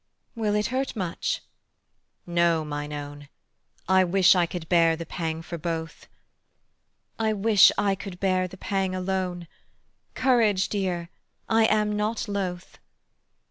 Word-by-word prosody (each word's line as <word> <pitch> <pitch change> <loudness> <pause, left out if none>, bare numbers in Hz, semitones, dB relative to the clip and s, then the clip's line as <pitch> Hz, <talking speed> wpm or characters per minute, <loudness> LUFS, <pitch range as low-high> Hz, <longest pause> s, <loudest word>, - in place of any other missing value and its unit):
"Will 215 -3 -1
it 210 0 +1
hurt 265 0 -1
much?" 185 -5 -3 0.8
"No, 170 -2 +1
mine 145 0 -5
own: 145 -1 -7 0.6
I 190 0 +5
wish 185 +1 +5
I 175 -2 +2
could 170 -2 -6
bear 165 -2 +4
the 165 +1 -7
pang 160 0 -4
for 170 0 -7
both." 165 0 -5 1.1
"I 220 -1 +1
wish 210 0 +6
I 200 -1 +2
could 190 -2 -8
bear 185 -1 +1
the 190 +1 -12
pang 190 -1 -2
alone: 185 -2 -3 0.7
Courage, 225 -7 +2
dear, 180 -4 -2 0.4
I 225 0 +4
am 210 -1 +1
not 210 +2 -2
loth." 185 -3 -4
185 Hz, 135 wpm, -25 LUFS, 170-205 Hz, 1.1 s, wish